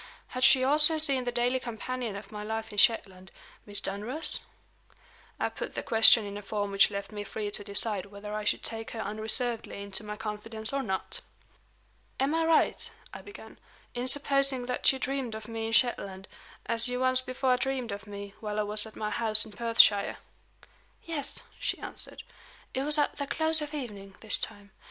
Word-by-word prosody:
Had 255 0 -3
she 260 -1 +6
also 300 +4 +4
seen 275 -5 +1
the 245 - -1
daily 245 +2 +1
companion 240 -1 -5
of 200 0 -9
my 210 -1 -7
life 220 +1 -4
in 205 - -1
Shetland 190 -5 +2 0.4
Miss 205 -1 +1
Dunross? 245 +11 -3 1.0
I - - +1
put - - -7
the - - -3
question 225 0 +7
in 200 0 -6
a - - -9
form 205 0 -3
which 195 0 +5
left 200 +1 -6
me 205 -1 -5
free 205 0 -5
to 205 - -3
decide 200 -1 +2
whether 205 +1 -9
I 215 0 -3
should 210 - -1
take 225 -1 -2
her - - -5
unreservedly 220 +2 0
into 200 +1 -4
my 210 0 -6
confidence 220 +2 -3
or 275 - 0
not. 190 -7 -4 1.0
"Am 275 +3 +1
I 325 0 +1
right," 325 - +2 0.2
I - - -8
began, 410 +1 -13 0.3
"in 245 +1 -3
supposing 275 -2 +2
that 250 0 +3
you 265 - -4
dreamed 265 -3 -3
of 220 0 -8
me 225 -1 -4
in - - -4
Shetland, 200 -5 +1 0.4
as 230 +1 +1
you 250 0 -2
once 255 0 +4
before 255 0 0
dreamed 260 -3 -2
of 200 +1 -7
me 200 -1 -8
while 210 -1 -4
I - - +2
was 210 +1 +3
at 220 - -14
my 210 0 -3
house 220 -1 +3
in 220 - -12
Perthshire?" 225 -3 +4 0.9
"Yes," 300 -4 -4 0.2
she - - -2
answered. - - -8 0.5
"It 260 - -1
was 300 +2 0
at 295 - 0
the 285 -1 -4
close 315 +2 +5
of 300 0 -5
evening, 200 -8 -7
this 220 - +2
time. 200 -1 -6
225 Hz, 190 wpm, -29 LUFS, 210-260 Hz, 1.0 s, question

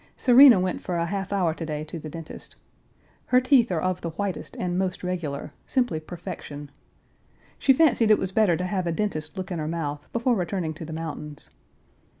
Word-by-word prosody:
Serena 250 -3 +8
went 185 0 -1
for 180 -2 -3
a 170 - 0
half 195 +2 -3
hour 180 -5 +1
to 165 - -7
day 155 -1 -3
to 155 +2 -7
the 155 - -8
dentist. 165 0 -10 0.7
Her 250 - +5
teeth 255 -3 +4
are 170 - 0
of 185 +1 -1
the 170 - -3
whitest 190 +3 -4
and 175 -1 -2
most 185 0 -2
regular, 155 -6 -4
simply 245 -12 0
perfection. 150 -3 -8 0.9
She 275 - +4
fancied 260 -6 +4
it 215 - +6
was 190 - -3
better 190 -5 +3
to 180 - -2
have 185 -1 -2
a - - +1
dentist 155 -5 -3
look 190 +1 -5
in 175 - -2
her 155 - -3
mouth 150 -3 -4
before 235 +2 +1
returning 175 -3 -2
to 160 +1 -8
the 160 - -8
mountains. 150 -2 -7
180 Hz, 195 wpm, -25 LUFS, 160-200 Hz, 0.9 s, Serena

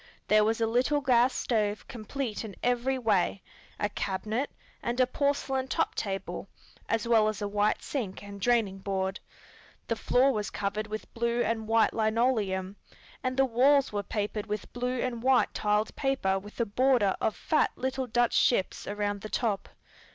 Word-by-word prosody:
There 215 0 +6
was 225 +2 +1
a 225 - +2
little 250 +6 +2
gas 255 -2 +4
stove 215 -5 -1
complete 235 0 -4
in 210 -3 -8
every 245 +2 +1
way, 200 -5 +1 0.4
a 205 - +1
cabinet, 215 +6 -2 0.3
and 240 +2 -2
a 255 - +6
porcelain 270 0 0
top - - 0
table, 195 -2 -4 0.4
as 225 0 0
well 225 -2 +5
as 215 -2 -2
a 205 - -2
white 205 +1 +1
sink 215 -9 -4
and 200 -1 -9
draining 220 -4 +2
board. 190 0 -2 0.7
The 230 - +1
floor 255 +4 +3
was 210 -2 -2
covered 205 +2 -3
with 215 0 -7
blue 235 +1 0
and 220 -1 -1
white 225 0 +3
linoleum, 215 -4 0 0.5
and 255 0 -1
the 270 - +5
walls 265 +2 +3
were 205 - 0
papered 210 +1 -3
with 210 0 -5
blue 250 +1 -2
and 240 -2 -2
white 260 +1 +3
tiled 210 +1 0
paper 260 -9 0
with 205 +4 -13
a 235 - +2
border 235 -2 +2
of 220 - +1
fat 310 - +2
little 260 0 -2
Dutch 240 0 +2
ships 195 -6 +2
around 205 0 -2
the 215 - -7
top. 215 -4 -1
225 Hz, 170 wpm, -29 LUFS, 205-250 Hz, 0.7 s, There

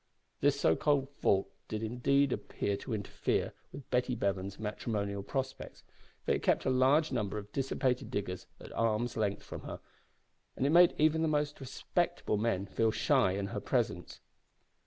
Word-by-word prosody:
This - - +3
so 80 - +4
called 140 - +1
fault 100 -8 +2 0.2
did 110 0 -3
indeed 130 +4 +2
appear 100 - -2
to 125 - -6
interfere 100 -2 -1 0.2
with 140 - -10
Betty 125 0 +1
Bevan's 100 -2 -2
matrimonial 105 -2 -3
prospects, 130 +5 -4 0.4
for - - +1
it - - +1
kept - - +2
a 130 - +2
large 135 +5 +4
number 105 -5 -1
of 105 -1 -7
dissipated 130 -2 0
diggers 100 -6 -4
at - - -11
arm's 115 +1 0
length 105 -2 -1
from - - -8
her, - - -7 0.8
and 130 - 0
it 140 - +3
made 175 +1 +7
even 155 +1 +3
the 160 - +2
more 150 -1 +2
respectable 125 -4 -1
men 105 -3 0
feel 110 +3 +1
shy 125 -4 +3
in 100 0 -2
her - - -3
presence. - - -1
120 Hz, 165 wpm, -32 LUFS, 100-135 Hz, 0.8 s, made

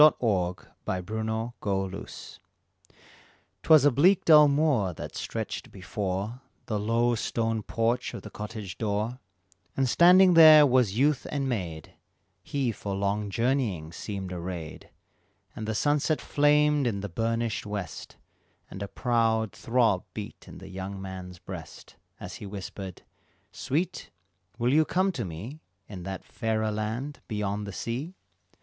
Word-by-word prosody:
THE 155 0 +8 0.7
FAIREST 90 +2 -3
LAND. 110 -3 -3 1.5
'Twas 155 -3 +6
a 145 - +6
bleak 175 +9 +4
dull 150 -2 +8
moor 140 - +2
that - - -7
stretched - - -5
before 100 +4 -4 0.2
The 110 -3 -2
low 115 +3 +2
stone 115 -1 -1
porch 115 +3 -1
of - - -8
the - - -9
cottage 105 -3 -7
door, 110 +3 -1 0.6
And 135 -1 +2
standing 180 +6 +7
there 155 -2 +9
was 125 -6 +2
youth 145 +2 +2
and 140 -2 -1
maid, 90 - -4 0.5
He 130 +4 -1
for 100 -2 -5
long 100 +1 -1
journeying 115 - 0
seemed 95 +1 -5
arrayed, 85 -2 -6 0.7
And 110 - -5
the 110 - -1
sunset 145 +5 +1
flamed 150 -1 +3
in 100 -4 -1
the 100 - -3
burnished 115 +3 -2
west, 100 -5 -6 0.5
And 95 - -8
a 100 - -3
proud 110 -1 +1
throb 115 -6 +1
beat 105 -2 -8
in - - -10
the - - -11
young 95 +1 -6
man's 95 -1 -7
breast, - - -10 0.2
As - - -7
he 105 - -8
whispered, 95 -2 -7 0.5
"Sweet, 160 +7 -2 0.5
will 120 +2 +1
you 155 +2 +6
come 185 +4 +1
to 140 -10 -4
me 100 - -7 0.3
In 95 -4 -8
that 95 -1 -6
fairer 110 -1 -1
land 110 +7 -3
beyond 105 -1 -2
the - - -5
sea?" 130 - -4
110 Hz, 140 wpm, -27 LUFS, 100-135 Hz, 1.5 s, there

